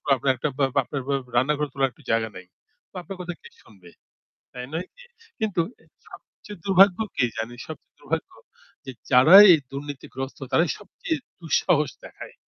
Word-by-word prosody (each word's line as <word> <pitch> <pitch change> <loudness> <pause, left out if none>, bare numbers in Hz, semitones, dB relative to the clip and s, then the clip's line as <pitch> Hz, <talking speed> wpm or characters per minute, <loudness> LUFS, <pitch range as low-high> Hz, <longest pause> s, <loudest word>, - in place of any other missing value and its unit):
আপনার 130 +1 0 1.0
রান্নাঘর 150 +4 +1
তোলার 135 -1 +1
একটা - - -22
জায়গা 115 0 +1
নাই। 95 0 -10 0.6
আপনার 195 +2 -9
কথা 175 0 -5
কে - - -13 0.2
শুনবে? 95 -5 -18 0.6
তাই 125 0 -7
নয় 165 +3 -3
কি? - - -16 0.4
কিন্তু 210 -5 0 0.5
সবচেয়ে 205 -2 -13
দুর্ভাগ্য 195 -1 +5 0.2
কি 125 - +2
জানে 115 +2 -4
সবচেয়ে - - -11
দুর্ভাগ্য - - -4 0.5
যে 130 - -6 0.2
যারাই 155 +11 +9
এই 160 - +1
দুর্নীতিগ্রস্ত 135 -1 -7
তারাই 165 +5 +3
সবচেয়ে 315 +9 -5 0.2
দুঃসাহস 160 -2 +1
দেখায়। - - -11
145 Hz, 135 wpm, -24 LUFS, 125-180 Hz, 1.0 s, যারাই